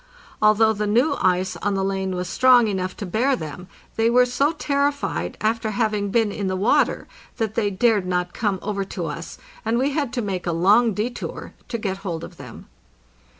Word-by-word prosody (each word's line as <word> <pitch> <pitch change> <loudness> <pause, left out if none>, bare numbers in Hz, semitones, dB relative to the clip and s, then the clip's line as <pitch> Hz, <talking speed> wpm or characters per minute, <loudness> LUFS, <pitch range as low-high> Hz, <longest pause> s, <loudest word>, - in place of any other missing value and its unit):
Although 215 +1 +5
the 210 0 -2
new 250 +8 +2
ice 185 0 +1
on 200 +3 -1
the 195 - 0
lane 190 -1 -2
was 180 0 -3
strong 250 +3 +5
enough 185 -2 -3
to 205 - -5
bear 240 +9 +1
them, 160 - -7 0.3
they 225 +1 +3
were 250 +1 +5
so 275 +4 +1
terrified 285 -2 -1
after 220 0 0
having 210 -2 0
been 220 0 +2
in 200 -1 -3
the 185 - -1
water 195 +5 +2 0.3
that 220 -2 -1
they 215 -2 +1
dared 200 -1 +2
not 180 -1 -1
come 205 -4 -1
over 200 -1 -2
to 185 -2 -5
us, 165 +2 -6 0.3
and 225 +1 0
we 270 +3 +1
had 285 -4 -1
to 245 - -1
make 190 -3 -3
a - - +1
long 205 +6 +4
detour 235 +4 -4
to 235 - -3
get 195 -4 -3
hold 175 -5 -5
of 175 - -10
them. 125 -5 -11
210 Hz, 195 wpm, -22 LUFS, 185-235 Hz, 0.3 s, Although